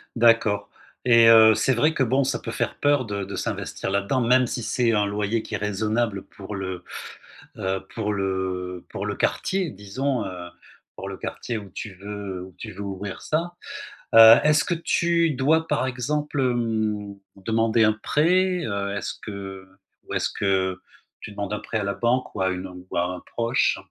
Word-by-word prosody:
D'accord 115 -3 +3 0.4
et 115 -2 +7
heu, 110 -1 +8
c'est 130 - +2
vrai 150 +7 +2
que 135 - +1
bon 130 +3 +2
ça 130 -3 -1
peut 115 - -6
faire - - -2
peur 145 -3 +3
de 100 -2 -3
de 100 - -6
s'investir - - -3
là-dedans, 100 +7 0
même 125 +2 +4
si 120 - -3
c'est 120 +1 +1
un 105 -1 +2
loyer 105 +2 -1
qui - - -5
est - - 0
raisonnable 105 +1 -1
pour 100 +1 -9
le, 95 -2 -5 0.8
heu, 95 0 -2
pour 105 -2 -1
le 95 -2 -3
pour - - -5
le - - -3
quartier 190 -3 0
disons, 115 +7 -2
heu, 90 -2 -7 0.5
pour 95 - -7
le 95 - -7
quartier 120 -2 -4
où 100 -2 -10
tu 95 +2 -7
veux 100 -1 -6
où 95 -1 -14
tu 110 - -7
veux 100 - -10
ouvrir 100 0 -5
ça. 170 +3 -1 0.6
Heu, 115 0 +11
est-ce 150 0 +4
que 180 - -1
tu 170 0 +1
dois, 155 +5 +2
par 150 -3 0
exemple, 145 +4 -2
hem, 110 -5 -1 0.2
demander 115 +3 +1
un 110 0 +4
prêt? 180 +3 +2
Heu, 100 -1 -2
est-ce 105 - -3
que 95 -2 -7 0.4
ou - - -6
est-ce - - 0
que 95 -1 0 0.4
tu - - -9
demandes 100 0 -4
un 105 - -2
prêt 115 - -3
à 105 - -1
la 100 0 -1
banque 125 +2 0
ou 100 - -2
à 95 - +2
une 90 0 -6
ou - - -4
à 85 - +3
un 90 - -6
proche? 115 +2 0
110 Hz, 190 wpm, -24 LUFS, 100-130 Hz, 0.8 s, Heu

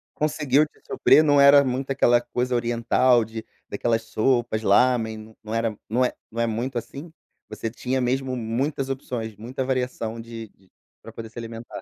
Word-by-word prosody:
Conseguiu 150 -1 +2
te - - -29
suprir, 155 - +4
não 145 -2 +4
era 140 0 +8
muito 130 +1 -2
aquela 120 -3 +4
coisa 125 +1 -2
oriental 120 +1 +2
de 110 0 -8 0.2
daquelas 115 -1 -1
sopas, 115 0 0
lámen, 110 0 +1
não 110 - -6
era, 115 -2 -1
não 120 +4 +2
é - - -2 0.2
não 115 - -3
é 115 - +1
muito 120 +3 -3
assim, 140 +8 -7 0.4
você 115 - -4
tinha 130 +3 -2
mesmo 130 +1 -1
muitas 130 +4 -2
opções, 120 -5 -4
muita 120 +6 -5
variação 125 -3 -2
de 115 -1 -8
de 95 -1 -30 0.3
pra 115 - -11
poder 115 0 -9
se 115 - -18
alimentar. 115 0 -8
120 Hz, 175 wpm, -24 LUFS, 115-130 Hz, 0.4 s, era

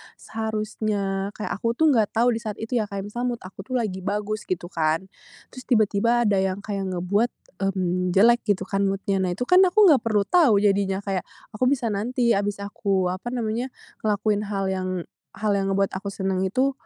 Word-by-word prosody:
seharusnya 215 -3 -2
kayak 215 - -5
aku 230 +1 0
tuh, 315 +4 +4
nggak 220 -6 +2
tahu 235 +2 +4
di 230 - -1
saat 210 -2 -3
itu 230 +3 -1
ya, 215 - +1
kayak 200 0 -6
misal 240 +4 -3
mood 240 -1 -2
aku 190 +1 -10
tuh 255 - -7
lagi 190 -4 -3
bagus 210 +1 -2
gitu 175 -1 -3
kan, 160 0 +1 0.5
terus 255 -1 -11
tiba-tiba 230 +1 +3
ada 200 - +2
yang 190 +1 -1
kayak 200 -2 -3
ngebuat, 200 +7 +1 0.4
mmm, 180 -1 -1
jelek 235 +5 +5
gitu, 205 -3 +1
kan, 195 0 +1
mood-nya. 195 0 -1
Nah, 185 -2 0
itu 250 +8 -4
kan, 365 - +7
aku 370 +4 +3
nggak 290 -5 +5
perlu 215 -2 +2
tahu 270 - +5
jadinya, 200 -1 +1
kayak 195 -2 -3 0.3
aku 230 +3 -1
bisa 250 -3 +1
nanti, 235 +2 +1
abis 200 0 -2
aku, 195 -2 -1
apa 185 +7 -5
namanya, 240 +2 -2 0.3
ngelakuin 210 0 +1
hal 195 -2 -2
yang 185 -1 -2 0.5
hal 215 -1 0
yang 195 0 0
ngebuat 195 0 +1
aku 200 - -8
seneng 190 -1 -2
itu, 260 +7 +1
205 Hz, 195 wpm, -24 LUFS, 195-230 Hz, 0.5 s, kan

